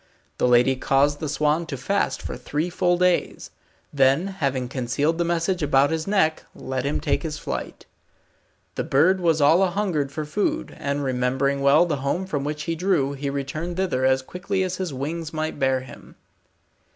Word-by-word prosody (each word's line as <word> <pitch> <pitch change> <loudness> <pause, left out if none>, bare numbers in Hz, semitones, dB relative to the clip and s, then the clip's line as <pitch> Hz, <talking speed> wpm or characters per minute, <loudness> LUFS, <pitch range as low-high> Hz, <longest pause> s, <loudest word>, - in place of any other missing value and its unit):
The - - +3
lady 125 +2 +4
caused 140 +2 +2
the 155 - -3
swan 150 +3 +1
to 140 - -5
fast 135 0 -1
for - - -5
three 150 +7 -3
full 175 0 +1
days; 180 -1 0 0.4
then 135 +4 +3
having 140 -9 -2
concealed 140 +6 -1
the - - +3
message 170 +2 0
about 140 -1 +3
his 160 +1 -2
neck, 190 -6 +1
let 130 0 -4
him 145 - -1
take - - 0
his 155 -3 -4
flight. - - -6 0.9
The - - -2
bird 165 +8 +3
was 165 -3 +2
all 155 +5 +5
anhungered 185 -6 0
for 155 +2 -5
food, 175 +8 -2
and 140 0 -2
remembering 130 +2 0
well 140 +5 +5
the 155 -4 -1
home 140 +8 -2
from 150 -7 -3
which 150 +1 -3
he 165 - -2
drew, 160 -6 +1
he 140 0 -4
returned 155 +5 -4
thither 180 -9 0
as 130 0 +3
quickly 190 +5 -2
as 185 0 -3
his 185 -4 -3
wings 155 +5 -4
might 155 -1 -3
bear 130 -1 +2
him. 130 -1 -13
150 Hz, 180 wpm, -23 LUFS, 135-170 Hz, 0.9 s, all